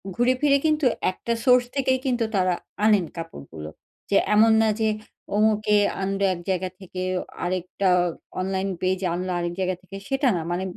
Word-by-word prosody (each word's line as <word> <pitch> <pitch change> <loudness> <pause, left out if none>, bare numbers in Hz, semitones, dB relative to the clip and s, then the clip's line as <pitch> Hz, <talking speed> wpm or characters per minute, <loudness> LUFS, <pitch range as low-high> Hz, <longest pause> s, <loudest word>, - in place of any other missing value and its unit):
ঘুরেফিরে 255 +5 +3
কিন্তু 305 -2 +2 0.3
একটা 235 +5 -3
সোর্স 250 -1 +6
থেকেই 260 -1 +1
কিন্তু 245 -3 +1
তারা 185 -1 +2 0.3
আনেন 210 -5 +4
কাপড়গুলো। 140 - -8 0.4
যে 200 - +4 0.2
এমন 220 +2 +6
না 220 - +3
যে 220 -1 +2 0.5
অমুকে 210 0 +3 0.2
আনবে 195 +1 0
এক 175 - -7
জায়গা 185 0 0
থেকে, 185 -1 -7 0.4
আরেকটা 185 +2 -1 0.5
অনলাইন 190 +1 -1
পেজ 185 0 +1
আনলো 185 +1 -3
আরেক 175 0 -2
জায়গা 185 0 0
থেকে 190 +1 -10
সেটা 270 0 +1
না। 170 - -1
মানে 175 +2 -1
195 Hz, 155 wpm, -24 LUFS, 185-235 Hz, 0.5 s, সোর্স